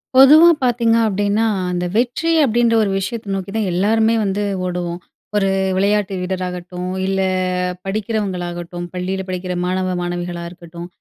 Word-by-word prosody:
பொதுவா 300 +6 +8
பார்த்தீங்க 235 -2 +2
அப்டீன்னா, 205 +1 +1 0.3
அந்த 180 0 -1
வெற்றி 245 +8 +1
அப்டீன்ற 235 -1 +2
ஒரு 200 - 0
விஷயத்த 200 +1 -4
நோக்கி 190 0 -5
தான் 215 -4 0
எல்லாருமே 220 +4 +2
வந்து 200 +1 -1 0.2
ஓடுவோம். 175 -1 -3 0.4
ஒரு 195 -2 +2 0.3
விளையாட்டு 200 0 +1
வீரராகட்டும், 180 -1 -4
இல்ல 195 0 0 0.6
படிக்கிறவங்களாகட்டும், 180 -4 -3
பள்ளியில 185 +1 -3
படிக்கிற 180 0 -3
மாணவ, 185 0 -1
மாணவிகளா 175 0 -4
இருக்கட்டும், 170 -1 -10
190 Hz, 125 wpm, -19 LUFS, 180-220 Hz, 0.6 s, பொதுவா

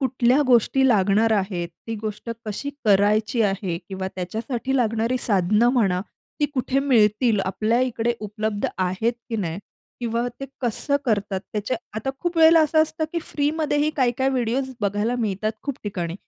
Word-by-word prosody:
कुठल्या 255 +1 +2
गोष्टी 255 +2 +4
लागणार 215 0 +3
आहेत, 190 -4 -1 0.2
ती 225 - -3
गोष्ट 215 +2 -5 0.2
कशी 215 +7 -3
करायची 210 +3 +3
आहे. 195 -4 -1
किंवा 190 -1 -4
त्याच्यासाठी 225 +8 -3
लागणारी 230 +1 +1
साधनं 210 +1 +2
म्हणा. 195 -8 +2 0.4
ती 295 - +4
कुठे 260 +1 0
मिळतील? 225 -4 +3
आपल्या 215 +5 +1
ईकडे 240 -2 0
उपलब्ध 210 0 -2
आहेत, 185 +6 0 0.2
की 225 - -1
नाही? 175 -4 -3 0.4
किंवा 235 0 -1
ते - - -3 0.2
कसं 255 +4 0
करतात 200 -5 0
त्याच्या 215 +4 -2 0.2
आता 245 +5 -2
खूप 345 -1 -2
वेळेला 325 0 +7
असं 315 +1 +4
असतं, 315 0 -2
की 340 - 0
फ्रीमध्येही 295 0 0
काही-काही 260 0 +2
व्हिडिओज 260 +1 -1
बघायला 205 +4 0
मिळतात 215 -1 -1
खूप 280 - -3
ठिकाणी, 175 -5 -3
225 Hz, 150 wpm, -23 LUFS, 205-260 Hz, 0.4 s, वेळेला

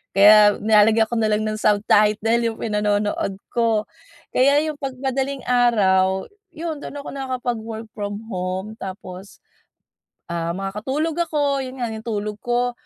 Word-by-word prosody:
Kaya 205 +1 +7
nilalagyan 220 +1 +5
ko - - -1
na 220 - +2
lang 215 0 +1
ng 215 0 -3
subtitle 210 +2 +3
yung 230 -1 -1
pinanonood 210 -2 -1 0.2
ko. 230 -3 +1 0.5
Kaya 280 +3 +4
yung 305 -2 -4
'pag 270 -2 -4
madaling 270 +1 -2
araw, 190 -6 +3 0.3
yun 320 -2 -4
do’n 290 - -8
ako 285 - -7
nakakapag-work 240 -4 -4
from 205 -1 -4
home 185 +3 -3
tapos, 190 0 -8 1.0
ah, 170 0 -2
makakatulog 265 - -3
ako. 285 -3 0
'Yon 260 0 -6
nga 235 - -1
yung 220 +1 -8
tulog 210 -2 -3
ko, 245 0 0
220 Hz, 140 wpm, -22 LUFS, 205-255 Hz, 1.0 s, Kaya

